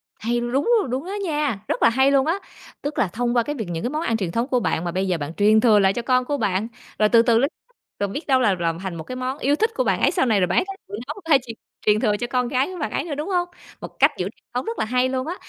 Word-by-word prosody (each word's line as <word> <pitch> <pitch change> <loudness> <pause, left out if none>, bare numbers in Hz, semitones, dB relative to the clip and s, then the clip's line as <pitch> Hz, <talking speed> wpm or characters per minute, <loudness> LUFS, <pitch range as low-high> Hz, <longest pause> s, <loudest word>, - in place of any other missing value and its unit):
Hay, 240 +3 -1
đúng 240 +4 0 0.2
rồi, 400 - -2
đúng 260 +5 -3
đó 375 - -6
nha, 295 - -1
rất - - -2
là - - +7
hay 265 +4 +3
luôn 275 -1 +3
á. 325 - +2 0.5
Tức 290 +1 -4
là 210 - +3
thông 240 +6 -2
qua 240 - +4
cái 295 +5 -4
việc 220 -8 -4
những 165 -1 -4
cái 245 - 0
món 305 +3 -2
ăn 230 -8 0
truyền 190 -6 -3
thống 230 +6 -1
của 255 -3 +1
bạn, 170 -7 -1
mà 175 - -2
bây 190 +2 -1
giờ 180 -2 0
bạn 150 +1 -5
truyền 210 +3 +4
thừa 215 -3 +5
lại 195 -1 +3
cho 240 - -3
con 255 +1 +1
của 290 +2 -1
bạn, 205 -2 0 0.3
rồi 215 0 +4
từ 230 0 +6
từ 235 -1 +3
l - - +1 0.6
rồi 200 - 0
biết 285 - -6
đâu 265 -2 +4
là 210 -7 +3
làm 165 -1 -1
thành 190 -2 -5
một 160 - -6
cái 255 - -7
món 255 +2 -3
yêu 285 0 +1
thích 440 +8 +1
của - - +1
bạn - - 0
ấy - - +4
sau 350 - +1
này, 220 -5 +2
rồi 180 - +2
bạn 175 - 0
ấy - - +1
sẽ 390 - -5 0.2
thử - - -13
nấu 295 - -5
hay 305 -4 +5
truyền 230 -2 -7 0.3
truyền 210 0 +4
thừa 210 -3 +1
cho 240 - -3
con 250 0 0
gái 260 +2 +1
của 370 -1 -7
bạn 300 - -2
ấy - - -1
nữa, 310 -3 -4
đúng 300 +6 -4
hông? 355 -2 0 0.3
Một - - -5
cách - - +6
giữ - - -1
truyền - - -33
thống - - -2
rất 455 +1 -4
là - - +1
hay 250 +3 +1
luôn 260 +1 -2
á. 345 - -3
245 Hz, 330 wpm, -22 LUFS, 210-280 Hz, 0.6 s, là